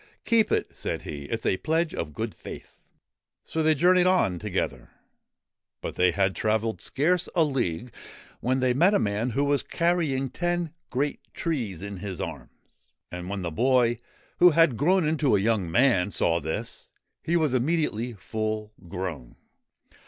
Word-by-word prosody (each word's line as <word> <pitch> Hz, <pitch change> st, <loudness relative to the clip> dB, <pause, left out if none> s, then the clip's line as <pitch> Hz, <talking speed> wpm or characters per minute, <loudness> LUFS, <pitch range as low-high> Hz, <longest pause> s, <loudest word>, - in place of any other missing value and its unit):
' -, -, -47 dB
Keep 230 Hz, -2 st, +3 dB
it,' -, -, 0 dB
said -, -, -4 dB
he; 70 Hz, -2 st, -6 dB
' -, -, -11 dB
it -, -, -2 dB
's -, -, -6 dB
a 95 Hz, -, +2 dB
pledge 160 Hz, -, 0 dB
of 75 Hz, -, -4 dB
good 110 Hz, -1 st, -3 dB
faith.' -, -, -11 dB, 0.6 s
So 160 Hz, -, -2 dB
they 155 Hz, 0 st, +4 dB
journeyed 180 Hz, +4 st, +4 dB
on 140 Hz, -, +2 dB
together. 100 Hz, -1 st, -3 dB, 0.9 s
But -, -, -5 dB
they 90 Hz, 0 st, +3 dB
had 95 Hz, +2 st, +1 dB
travelled 110 Hz, +1 st, 0 dB
scarce 175 Hz, +5 st, +1 dB
a 170 Hz, -, +5 dB
league 125 Hz, -, -2 dB, 0.5 s
when 130 Hz, +2 st, 0 dB
they 130 Hz, -1 st, +3 dB
met 175 Hz, +10 st, +4 dB
a -, -, +6 dB
man 105 Hz, +4 st, 0 dB
who 135 Hz, +4 st, 0 dB
was 145 Hz, 0 st, +2 dB
carrying 160 Hz, -6 st, 0 dB
ten 175 Hz, -2 st, -1 dB, 0.2 s
great 140 Hz, +3 st, -1 dB, 0.2 s
trees 115 Hz, -, -3 dB
in 100 Hz, -1 st, -6 dB
his 95 Hz, -2 st, -6 dB
arms. -, -, -9 dB, 0.2 s
And 90 Hz, +1 st, -6 dB
when 100 Hz, -2 st, -3 dB
the 85 Hz, -, -3 dB
boy, 120 Hz, +4 st, +2 dB, 0.4 s
who 180 Hz, -, +9 dB
had 165 Hz, -5 st, +4 dB
grown 170 Hz, -, +3 dB
into 150 Hz, -7 st, +2 dB
a -, -, +3 dB
young 100 Hz, -4 st, +1 dB
man, 115 Hz, -2 st, +3 dB
saw 85 Hz, -4 st, +1 dB
this, 80 Hz, 0 st, -5 dB, 0.3 s
he 170 Hz, +2 st, +1 dB
was 155 Hz, -5 st, +1 dB
immediately 130 Hz, -4 st, 0 dB
full 110 Hz, +2 st, -4 dB
grown. 90 Hz, -9 st, -5 dB
125 Hz, 170 wpm, -26 LUFS, 100-160 Hz, 0.9 s, who